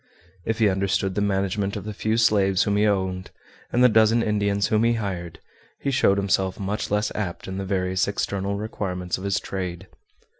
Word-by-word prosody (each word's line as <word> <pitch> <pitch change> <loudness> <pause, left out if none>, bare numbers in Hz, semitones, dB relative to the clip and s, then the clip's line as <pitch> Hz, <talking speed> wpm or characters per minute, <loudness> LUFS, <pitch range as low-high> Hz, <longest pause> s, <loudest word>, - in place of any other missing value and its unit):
If 110 0 -1
he 110 -2 +4
understood 95 0 0
the 105 - -1
management 100 0 0
of 105 - -5
the 105 +1 -5
few 110 +2 -1
slaves 100 -4 +3
whom 100 - 0
he 105 +1 +3
owned, 95 -2 -1 0.4
and 125 - +3
the - - +9
dozen 110 0 +4
Indians 100 -1 +1
whom 110 0 +2
he 115 0 +3
hired, 90 -7 -4 0.4
he 140 - -2
showed 100 -6 +3
himself 95 -1 0
much 100 +2 -3
less 105 +1 0
apt 95 -5 -4
in 95 0 -4
the 95 - -3
various 95 -1 0
external 100 -1 -2
requirements 95 -4 -3
of - - -9
his 100 -1 0
trade. 90 -2 -5
100 Hz, 190 wpm, -24 LUFS, 95-105 Hz, 0.4 s, the